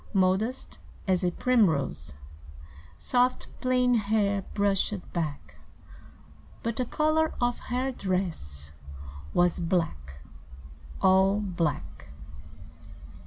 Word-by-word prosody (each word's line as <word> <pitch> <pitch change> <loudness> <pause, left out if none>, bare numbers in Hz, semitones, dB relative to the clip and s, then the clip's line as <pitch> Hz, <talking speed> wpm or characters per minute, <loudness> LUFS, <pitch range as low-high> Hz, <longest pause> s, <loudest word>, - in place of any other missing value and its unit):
Modest 195 +6 0 0.3
as 185 -1 +2
a 180 - +3
primrose, 145 - +1 0.8
Soft, 250 - +1 0.2
plain 250 -1 +3
hair 205 -2 +1
brushed 200 -1 0
back, 145 - -4 1.1
But 230 -1 -2
the 255 - -1
color 310 +2 +1
of 245 0 0
her 255 +2 0
dress 170 - -3 0.6
was 175 -1 +3
Black 155 - -2 0.8
all 190 +1 +5
black. 170 - -3
190 Hz, 85 wpm, -28 LUFS, 165-240 Hz, 1.1 s, all